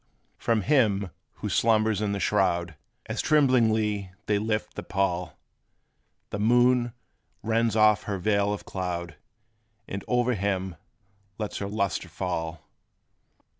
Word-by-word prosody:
From 115 -2 +1
him 105 - +2 0.2
who - - -6
slumbers 110 -2 +2
in 105 -1 0
the 100 - -2
shroud, 85 -5 +1 0.3
As - - -2
tremblingly 110 -9 +2
they 105 -1 +1
lift 110 0 -2
the - - -5
pall, 90 -2 -1 0.9
The 100 - -3
moon 120 +2 +3 0.5
rends 115 0 +1
off 105 -1 +4
her 100 -2 -2
veil 100 +2 +1
of 105 - -4
cloud, 85 -3 -4 0.7
And 100 0 -5
o'er 125 0 +2
him 95 -3 -2 0.6
lets 105 -2 -4
her 100 - -3
lustre 100 -3 -2
fall. 80 -3 -4
105 Hz, 125 wpm, -27 LUFS, 95-110 Hz, 0.9 s, off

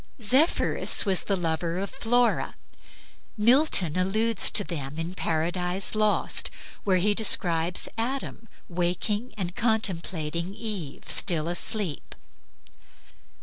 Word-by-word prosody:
Zephyrus 260 - +3
was 190 -3 +1
the 200 - +1
lover 165 -1 -2
of 195 +2 -4
Flora. 245 -2 0 0.8
Milton 225 - +3
alludes 215 +5 +2
to 205 - +4
them 150 -5 -6
in 165 +2 -4
"Paradise 180 +2 -1
Lost," 215 -1 +2 0.3
where 190 -2 +2
he 205 +4 +2
describes 175 -5 +2
Adam 240 -1 -4 0.2
waking 180 +7 -2
and 180 -2 -4
contemplating 180 -5 -2
Eve 205 -11 -5
still 165 -3 +1
asleep. 175 -1 -1
190 Hz, 105 wpm, -26 LUFS, 170-220 Hz, 0.8 s, to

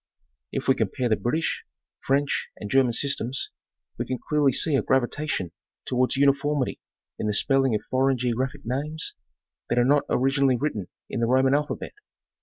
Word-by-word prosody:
If - - -3
we 135 - +6
compare 130 -1 -1
the 110 - +4
British, 155 +10 -1 0.4
French 140 +1 0
and 105 - -7
German 130 -3 +4
systems, 135 0 -1 0.5
we - - -1
can 130 - -2
clearly 150 +1 +2
see 155 +4 +1
a - - +3
gravitation 130 - 0 0.3
towards 130 +2 +1
uniformity 140 0 +2 0.4
in 105 - -1
the 105 - +1
spelling 135 -1 +3
of 105 - -2
foreign 130 0 +3
geographic 130 +4 -1
names 150 +6 -2 0.6
that 120 - 0
are 120 - +4
not 145 +2 +3
originally 135 0 +2
written 110 -9 -2 0.2
in - - -4
the 115 - +1
Roman 130 +2 +4
alphabet. 150 +1 -1
135 Hz, 160 wpm, -25 LUFS, 125-140 Hz, 0.6 s, we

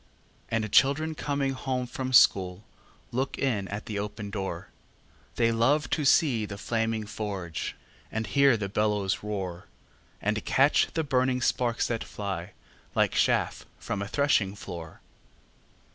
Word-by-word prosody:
And 110 -2 -1
children 155 +4 +4
coming 140 -2 -1
home 130 -1 -2
from 130 +1 -4
school 95 -5 +5 0.5
Look 130 +3 -2
in 110 -8 0
at 105 +3 -5
the 105 -2 -3
open 105 0 -5
door; 95 -5 -4 0.7
They 115 -1 +3
love 125 +4 +2
to 150 - 0
see 130 -7 +4
the 100 - -7
flaming 115 0 -1
forge, 100 -6 -4 0.4
And 110 0 -2
hear 135 +3 +4
the 100 -2 -3
bellows 105 -1 0
roar, 95 -4 -4 0.5
And 105 +1 -1
catch 140 +3 +4
the 160 - +1
burning 130 -2 +1
sparks 120 -1 +1
that 115 -2 -2
fly, 95 -4 -5 0.4
Like - - +3
chaff - - +1
from 105 -4 -4
a 100 - -3
threshing 110 -7 +2
floor. 85 -5 -8
110 Hz, 140 wpm, -28 LUFS, 100-130 Hz, 0.7 s, school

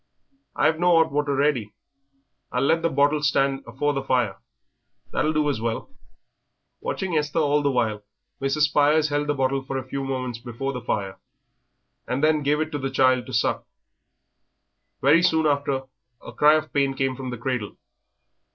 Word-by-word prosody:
"I've 160 0 +2
no 175 -1 +4
'ot 160 0 +3
water 145 0 0
ready; 130 -8 0 0.8
I'll 125 +1 0
let 165 +4 +2
the 165 - +1
bottle 145 +1 +2
stand 135 -1 +1
afore 145 +5 -1
the 135 - -2
fire, 125 -7 0 0.7
that'll 155 - +1
do 155 -1 +1
as 140 -6 -1
well." 115 - -3 0.9
Watching 190 -3 -3
Esther 150 +1 -1
all 150 -2 +2
the 145 - +1
while, 110 -5 -1 0.4
Mrs. 135 +3 0
Spires 150 +1 +3
held 145 0 -1
the 145 - 0
bottle 135 0 0
a 130 - -3
few 135 +2 -5
moments 130 -3 -3
before 125 +3 -5
the 125 - -5
fire, 100 -4 -3 0.9
and 130 +3 -2
then 155 -1 +3
gave 145 +1 +1
it 155 0 -2
to 145 - -3
the 135 0 -2
child 130 -2 +2
to - - -8
suck. - - 0 1.3
Very 150 +5 +5
soon 160 -2 +2
after 140 -2 0 0.4
a - - -10
cry 150 +1 +5
of 155 0 -2
pain 140 -1 +1
came 135 -1 -1
from 130 0 -6
the 125 - -5
cradle. 120 -3 -3
140 Hz, 170 wpm, -24 LUFS, 130-150 Hz, 1.3 s, Very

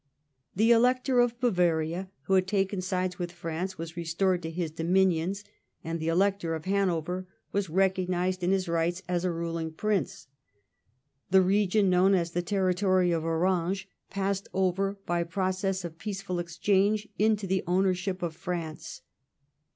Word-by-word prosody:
The 220 +5 +4
Elector 250 +2 +3
of 240 0 +2
Bavaria, 175 -5 +1
who 195 - -1
had 185 -1 +3
taken 195 -1 0
sides 185 0 -2
with 175 -1 -3
France, 175 +2 -4
was 165 0 -7
restored 175 +2 0
to 160 - -4
his 165 -1 -3
dominions, 180 +3 +1 0.4
and 165 +1 -3
the 160 - -3
Elector 180 -1 +1
of 160 - -7
Hanover 185 -2 0 0.2
was 200 -3 -1
recognised 185 0 0
in 175 - +2
his 190 -1 +1
rights 170 +2 0
as 180 -1 -1
a 180 - +1
ruling 165 -1 -3
prince. 195 +2 -2 1.0
The 190 0 +6
region 200 +1 +2
known 185 +2 +4
as 170 -2 0
the 175 - -1
territory 185 -1 +2
of 165 -2 0
Orange 180 +3 0 0.2
passed 195 0 -2
over 190 +1 +1
by 175 0 0
process 185 +1 -1
of 165 -1 -8
peaceful 195 -3 -4
exchange 200 +5 +1
into 215 -1 +2
the 190 0 0
ownership 185 +1 0
of 165 -2 -3
France. 170 -3 -5
185 Hz, 150 wpm, -28 LUFS, 170-195 Hz, 1.0 s, The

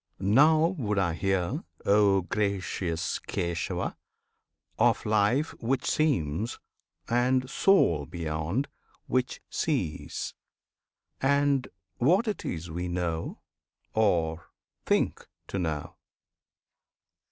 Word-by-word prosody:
Now 150 +11 +5
would 105 -5 -1
I 85 -4 +2
hear, 95 - 0 0.2
O 100 -1 +5
gracious 95 -4 -1
Kesava![FN#26] 85 -1 -2 0.8
Of - - +3
Life 110 +8 +2
which 125 +2 0
seems, 110 - 0 0.5
and 125 +2 +2
Soul 85 - +3
beyond, 85 - -2 0.4
which 130 0 -1
sees, 125 - -2 0.9
And 140 -1 +2 0.3
what 180 - +3
it 210 - -2
is 85 0 -4
we 90 +2 -3
know 85 -2 -3 0.5
or 85 -6 +1 0.4
think - - +1 0.2
to 95 - -2
know. 80 -4 -3
100 Hz, 90 wpm, -28 LUFS, 85-130 Hz, 0.9 s, Now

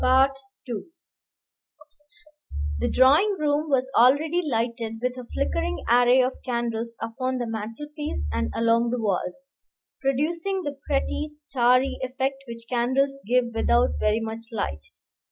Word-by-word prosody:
The 265 +2 +5 2.6
drawing 300 +11 +5
room 300 0 0
was 260 -2 +2
already 295 +8 +4
lighted 230 -4 -2
with 250 +1 -1
a 250 -2 -9
flickering 85 +3 -1
array 245 +2 +5
of 255 +1 -3
candles 235 -1 -3
upon 255 +3 -2
the 245 - -2
mantelpiece 230 - -5
and 75 0 -1
along 230 +1 +3
the 245 +1 -1
walls, 215 +5 -2 0.5
producing 330 +8 0
the 285 -2 -5
pretty, 295 +1 0
starry 270 -3 +1
effect 265 +1 -2
which 230 0 -8
candles 265 +3 +1
give 240 0 +2
without 80 - +2
very 215 +1 +2
much 225 0 -5
light. 80 - -3
250 Hz, 120 wpm, -25 LUFS, 230-275 Hz, 2.6 s, The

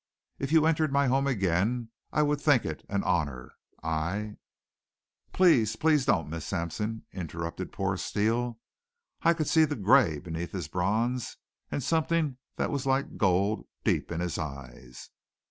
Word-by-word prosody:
If 135 +1 -3
you 160 -1 +5
entered 155 -2 +2
my 140 0 +3
home 135 +2 +2
again 110 +1 0 0.2
I 150 - +2
would 145 -1 0
think 145 -6 +4
it 80 - -5
an 100 0 0
honor. 70 -7 -1 0.3
I 85 +7 -2 0.5
" - - -51
"Please 120 - +4
please 150 -1 +2
don't, 95 - +2
Miss 80 +1 -5
Sampson," 105 +7 -3
interrupted 85 -1 -5
poor 95 -1 -1
Steele. 115 +5 0 0.6
I 170 0 +4
could 155 -3 -1
see 160 - +5
the 150 -1 0
gray 110 - +4
beneath 85 +1 -5
his 90 -6 -3
bronze 110 +9 -1 0.3
and 140 - -3
something 160 -2 +1 0.2
that - - -1
was 140 -1 -2
like 135 +1 0
gold 100 +2 +1 0.2
deep - - 0
in 85 0 -2
his 90 -1 -2
eyes. 65 -4 -8
110 Hz, 155 wpm, -28 LUFS, 85-140 Hz, 0.6 s, you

